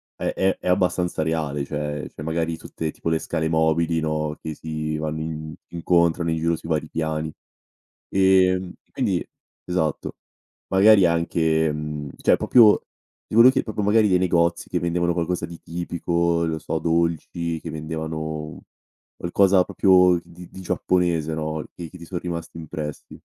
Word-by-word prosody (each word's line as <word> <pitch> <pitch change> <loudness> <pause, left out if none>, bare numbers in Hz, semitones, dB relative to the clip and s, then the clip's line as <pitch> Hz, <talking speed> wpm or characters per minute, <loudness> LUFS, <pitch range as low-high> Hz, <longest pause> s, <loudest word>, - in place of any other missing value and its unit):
è - - -2
è 95 0 +1
è - - -7
abbastanza 90 -2 +1
reale 75 -3 -2
cioè 75 0 -4
cioè 75 - -8
magari 80 0 -1
tutte 80 -1 -5
tipo 80 - -4
le 80 - +2
scale 80 -1 -2
mobili, 80 +1 +2
no, 75 -1 -2
che 80 - -5
si 75 -1 -4
vanno 80 0 -3
in 80 -1 -5
incontrano 85 0 +1
in 80 - 0
giro 85 +1 +1
sui 80 - -10
vari 80 -1 0
piani. 80 -1 -3 0.8
Ehm, 95 -1 +3
e - - -40
quindi - - -1 0.4
esatto, 80 -5 -2 0.5
magari 100 0 +6
anche 80 -2 +1
mhmm, 75 -1 -5
cioè - - +4
proprio 110 -4 +6 0.5
ti - - -12
volevo 120 +3 +8
chie - - +1
proprio 110 -1 -4
magari 105 0 +4
dei 90 - +4
negozi 85 -1 +1
che 90 - 0
vendevano 85 0 0
qualcosa 85 +1 -1
di 85 -1 -11
tipico, 85 0 -1
lo 80 -1 -2
so 80 - -3
dolci, 85 0 -1
che 80 - -7
vendevano 80 0 -5 0.5
qualcosa 95 +1 +3
proprio 90 -2 +4
di 90 +1 -13
di 95 - -10
giapponese, 85 -3 0
no, 80 0 -3
che 85 -2 -7
che 90 - -12
ti 85 - -11
son 90 0 -4
rimasti 85 -2 -6
impressi? 75 -1 -7
85 Hz, 160 wpm, -23 LUFS, 80-90 Hz, 0.8 s, volevo